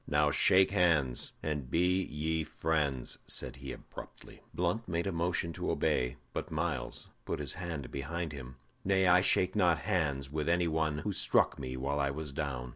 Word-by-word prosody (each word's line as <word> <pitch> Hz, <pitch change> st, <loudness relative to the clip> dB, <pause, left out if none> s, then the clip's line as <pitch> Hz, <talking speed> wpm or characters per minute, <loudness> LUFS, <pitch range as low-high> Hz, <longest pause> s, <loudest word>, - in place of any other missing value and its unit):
"Now 75 Hz, 0 st, +3 dB
shake 95 Hz, +6 st, +5 dB
hands, 80 Hz, -10 st, +2 dB
and 75 Hz, -5 st, -2 dB
be 90 Hz, +5 st, +3 dB
ye 80 Hz, -1 st, -1 dB
friends," 75 Hz, -6 st, -1 dB
said -, -, -2 dB
he, 65 Hz, 0 st, -7 dB
abruptly. -, -, -11 dB
Blunt 90 Hz, +7 st, -1 dB
made 85 Hz, 0 st, -1 dB
a 100 Hz, -, 0 dB
motion 85 Hz, 0 st, -1 dB
to -, -, -3 dB
obey, 60 Hz, -1 st, +1 dB, 0.2 s
but -, -, -3 dB
Myles 75 Hz, -5 st, -2 dB
put -, -, -2 dB
his 70 Hz, -3 st, -2 dB
hand 80 Hz, -7 st, -5 dB
behind 80 Hz, +4 st, -3 dB
him. 65 Hz, -3 st, -8 dB, 0.3 s
"Nay, 95 Hz, -1 st, +3 dB
I 90 Hz, 0 st, +6 dB
shake 95 Hz, 0 st, +3 dB
not 90 Hz, -5 st, +4 dB
hands 70 Hz, -9 st, 0 dB
with 75 Hz, +1 st, -1 dB
any 85 Hz, 0 st, +3 dB
one 80 Hz, -2 st, 0 dB
who 100 Hz, +6 st, -2 dB
struck -, -, +2 dB
me 65 Hz, -1 st, -4 dB
while 70 Hz, +3 st, -1 dB
I 70 Hz, -1 st, +2 dB
was 75 Hz, +1 st, -4 dB
down." 65 Hz, -3 st, -3 dB
80 Hz, 180 wpm, -32 LUFS, 70-85 Hz, 0.3 s, I